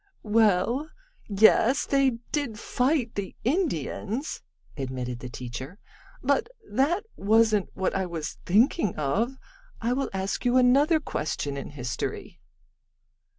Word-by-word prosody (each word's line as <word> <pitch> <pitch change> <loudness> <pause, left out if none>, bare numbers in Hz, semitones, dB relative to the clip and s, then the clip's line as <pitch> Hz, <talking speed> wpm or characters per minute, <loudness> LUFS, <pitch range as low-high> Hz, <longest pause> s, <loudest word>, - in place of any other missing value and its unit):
"Well, 220 - +2 0.4
yes, 220 +7 +5
they 270 -3 +2
did 280 -8 -2
fight 250 +1 0
the 200 -2 -5
Indians," 265 - -1 0.3
admitted 125 -3 -4
the 125 - -7
teacher, 125 +7 -7 0.5
"but - - +2 0.2
that 345 +10 +1
wasn't 215 0 +3
what 190 - 0
I 190 -1 0
was 165 -2 -5
thinking 210 - +3
of. 205 - 0 0.4
I 235 +2 0
will 270 +1 -1
ask 190 +1 -2
you 245 +1 +3
another 280 +6 +5
question 150 - -3
in 140 - -5
history." 125 -4 -5
220 Hz, 115 wpm, -27 LUFS, 165-265 Hz, 0.5 s, yes